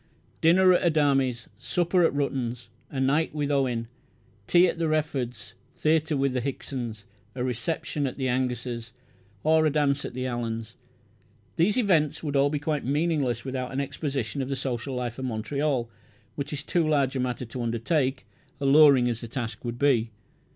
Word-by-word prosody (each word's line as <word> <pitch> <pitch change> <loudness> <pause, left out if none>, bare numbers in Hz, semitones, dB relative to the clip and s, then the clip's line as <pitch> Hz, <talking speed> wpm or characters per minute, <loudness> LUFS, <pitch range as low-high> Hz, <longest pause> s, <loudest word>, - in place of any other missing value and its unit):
Dinner 185 +3 +6
at - - +3
the - - +2
Adami's, 135 -6 +2
supper 175 +1 +1
at 165 - +4
Ruttan's, 125 -4 -2 0.2
a 135 - -4
night 145 +4 +1
with 145 -1 -1
Owen, 125 -5 0 0.6
tea 175 +1 +6
at 170 - -3
the 165 - +1
Reford's, 150 -6 -2 0.2
theatre 155 -1 +2
with 135 -1 +1
the 125 - 0
Hickson's, 120 -5 -5 0.3
a 125 - -2
reception 140 +3 -2
at 130 - -6
the 130 -2 -1
Angus's, 125 -2 -2 0.5
or 160 +1 +4
a - - +3
dance 145 -1 +1
at - - -6
the 130 0 -2
Allan's, 115 -2 -4 0.8
these 195 +7 +2
events 160 - +2
would 145 -2 -2
all 140 +1 +4
be 150 - -1
quite 150 0 -2
meaningless 140 -4 0
without 130 -1 -3
an 135 - -2
exposition 140 -2 -3
of 130 - -3
the 135 - -1
social 130 0 -3
life 125 0 -3
of 130 - -3
Montreal, 130 +2 -1 0.5
which 140 0 -5
is 145 -1 -4
too 170 -1 +1
large 140 -3 +2
a - - 0
matter 125 0 -2
to 120 +2 -6
undertake, 130 +4 0 0.3
alluring 140 -2 +6
as 120 -2 -2
the 115 - -6
task 115 -1 -5
would 120 -1 -4
be. 125 -5 +2
135 Hz, 175 wpm, -26 LUFS, 125-150 Hz, 0.8 s, Dinner